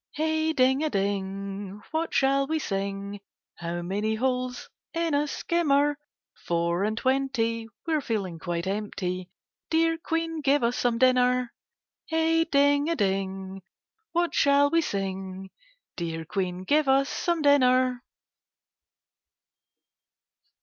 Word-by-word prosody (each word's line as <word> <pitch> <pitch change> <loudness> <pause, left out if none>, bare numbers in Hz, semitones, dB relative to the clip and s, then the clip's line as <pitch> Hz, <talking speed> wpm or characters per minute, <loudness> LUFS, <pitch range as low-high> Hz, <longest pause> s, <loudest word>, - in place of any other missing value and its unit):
Hey 315 +1 +1
ding 265 0 +3
a 310 - +1
ding, 195 -1 -3
what 325 +1 -1
shall 275 0 +2
we 320 +2 0
sing? 200 -4 -3 0.4
How 175 0 -4
many 205 +5 -1
holes 250 +1 -2 0.3
in 330 -2 0
a 290 +1 +2
skimmer? 290 -2 +1 0.4
Four 170 +2 0
and 215 +1 -2
twenty, 250 -4 0
— - - -65
we're 315 -2 +1
feeling 195 -9 -3
quite 170 0 -3
empty; 185 -2 -3 0.4
Dear 330 0 +2
Queen, 330 -1 -2
give 285 -1 +3
us 235 +1 +1
some 240 -2 +1
dinner. 250 0 +3 0.5
Hey 325 0 +2
ding 285 0 +3
a 335 - +1
ding, 195 -2 -2 0.5
what 345 0 0
shall 285 0 +4
we 330 - +4
sing? 190 - -4 0.4
Dear 165 -2 -4
Queen, 185 0 -3
give 295 +8 +2
us 270 +1 +4
some 340 0 -1
dinner. 255 -3 +4
250 Hz, 120 wpm, -27 LUFS, 195-290 Hz, 0.5 s, shall